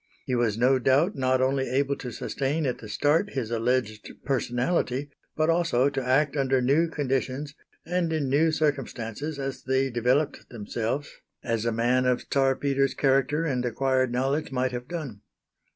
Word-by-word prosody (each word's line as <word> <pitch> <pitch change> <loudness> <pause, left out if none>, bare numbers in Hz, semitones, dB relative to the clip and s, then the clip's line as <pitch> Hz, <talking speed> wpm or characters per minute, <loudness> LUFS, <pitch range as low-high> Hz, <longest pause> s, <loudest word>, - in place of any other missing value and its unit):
He 130 - -2
was 120 -3 +1
no 130 +3 +3
doubt 140 - +3
not 130 -1 +1
only 135 0 +1
able 140 +2 +1
to 125 - -6
sustain 145 +6 -2
at 125 - -2
the 110 - -10
start 155 - +1
his 125 -5 -3
alleged 115 -2 -1 0.2
personality, 130 +1 -1 0.2
but 155 0 +1
also 165 -6 +2
to 135 -2 -2
act 135 +3 +2
under 135 -2 +2
new 145 +7 +2
conditions 140 -1 -2 0.3
and 175 0 0
in 155 -4 0
new 150 +5 +3
circumstances 145 -2 -2
as 135 -1 -4
they 130 0 0
developed 125 +5 0
themselves, 115 +5 -4 0.3
as 115 -1 -1
a 115 - +1
man 120 +3 +2
of 125 -1 +1
Czar 135 -1 +3
Peter's 135 0 0
character 140 +3 +2
and 130 -5 -1
acquired 130 +1 +1
knowledge 135 +4 -1
might 130 -1 0
have 125 0 -5
done. 140 -12 -6
135 Hz, 165 wpm, -26 LUFS, 125-145 Hz, 0.3 s, no